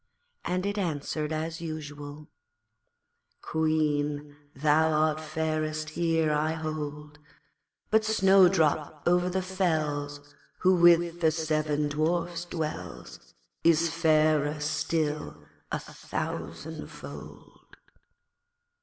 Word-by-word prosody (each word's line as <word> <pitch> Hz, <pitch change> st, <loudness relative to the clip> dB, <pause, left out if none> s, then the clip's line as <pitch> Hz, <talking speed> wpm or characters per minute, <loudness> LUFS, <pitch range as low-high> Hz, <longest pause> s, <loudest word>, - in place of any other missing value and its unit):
and 185 Hz, +1 st, -1 dB
it 205 Hz, +1 st, -1 dB
answered 155 Hz, -3 st, -2 dB
as 160 Hz, +1 st, -3 dB
usual 150 Hz, -2 st, -7 dB, 1.2 s
'Queen, 150 Hz, -2 st, 0 dB, 0.2 s
thou 155 Hz, +3 st, +3 dB
art 155 Hz, 0 st, +2 dB
fairest 155 Hz, 0 st, -2 dB
here, 165 Hz, -1 st, +1 dB
I 155 Hz, +1 st, +1 dB
hold, 150 Hz, -2 st, -5 dB, 0.7 s
But 220 Hz, 0 st, +4 dB
Snowdrop 185 Hz, -8 st, +3 dB
over 180 Hz, +1 st, +3 dB
the 185 Hz, +1 st, -1 dB
fells, 150 Hz, -6 st, -2 dB, 0.3 s
Who 185 Hz, +1 st, +5 dB
with 175 Hz, -1 st, +5 dB
the 160 Hz, -, +5 dB
seven 155 Hz, -2 st, 0 dB
Dwarfs 170 Hz, +3 st, -1 dB
dwells, 155 Hz, -, -6 dB, 0.3 s
Is 165 Hz, 0 st, +4 dB
fairer 155 Hz, -2 st, +3 dB
still 155 Hz, 0 st, -1 dB, 0.3 s
a -, -, 0 dB
thousandfold.' -, -, -7 dB
155 Hz, 90 wpm, -28 LUFS, 150-170 Hz, 1.2 s, Who